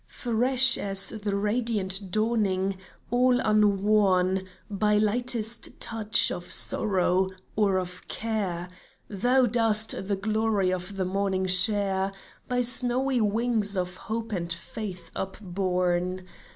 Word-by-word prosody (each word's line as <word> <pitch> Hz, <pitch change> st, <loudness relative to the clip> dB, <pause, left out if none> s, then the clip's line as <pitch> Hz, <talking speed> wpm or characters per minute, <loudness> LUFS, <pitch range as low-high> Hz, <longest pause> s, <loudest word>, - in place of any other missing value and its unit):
Fresh 255 Hz, +2 st, +2 dB
as 195 Hz, -1 st, +1 dB
the 205 Hz, -2 st, -3 dB
radiant 205 Hz, -3 st, 0 dB
dawning 200 Hz, -3 st, 0 dB, 0.2 s
— -, -, -32 dB
all 250 Hz, 0 st, +3 dB
unworn 200 Hz, -3 st, +2 dB, 0.2 s
By 210 Hz, +1 st, +1 dB
lightest 230 Hz, +1 st, -1 dB
touch 220 Hz, -1 st, +2 dB
of 175 Hz, -, -6 dB
sorrow, 190 Hz, -2 st, +2 dB, 0.3 s
or 200 Hz, -3 st, +2 dB
of 180 Hz, -1 st, -6 dB
care, 195 Hz, -6 st, -3 dB, 0.4 s
Thou 245 Hz, +6 st, +2 dB
dost 225 Hz, -2 st, +2 dB
the 200 Hz, -, 0 dB
glory 210 Hz, -2 st, 0 dB
of 185 Hz, +2 st, -5 dB
the 190 Hz, -, -1 dB
morning 190 Hz, 0 st, -1 dB
share 190 Hz, +1 st, +3 dB, 0.4 s
By 250 Hz, 0 st, 0 dB
snowy 250 Hz, +1 st, +1 dB
wings 215 Hz, -1 st, 0 dB
of 180 Hz, 0 st, -3 dB
hope 225 Hz, +2 st, -5 dB
and 170 Hz, -4 st, -3 dB
faith 180 Hz, 0 st, -6 dB
upborne 185 Hz, -1 st, -2 dB
205 Hz, 115 wpm, -26 LUFS, 185-225 Hz, 0.4 s, all